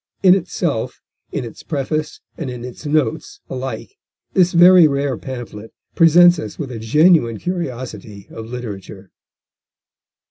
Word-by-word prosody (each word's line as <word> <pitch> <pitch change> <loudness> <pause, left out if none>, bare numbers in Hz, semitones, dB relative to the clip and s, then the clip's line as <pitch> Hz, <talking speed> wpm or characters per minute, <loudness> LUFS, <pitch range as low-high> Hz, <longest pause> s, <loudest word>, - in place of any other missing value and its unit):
In 185 -1 +7
itself, 165 -8 -2 0.3
in - - -3
its 115 - -10
preface, 155 +1 -3
and 150 -5 -5
in 125 -1 -7
its 125 +4 -9
notes 145 -6 -1
alike 135 - -6 0.4
this 180 -1 +3
very 175 -1 +7
rare 140 -2 -1
pamphlet 120 -4 -9 0.2
presents 175 +1 +6
us 105 - -7
with 140 -5 -5
a 115 - -6
genuine 135 0 +3
curiosity 120 - -6
of 110 0 -8
literature. 105 -5 -8
135 Hz, 130 wpm, -19 LUFS, 115-165 Hz, 0.4 s, In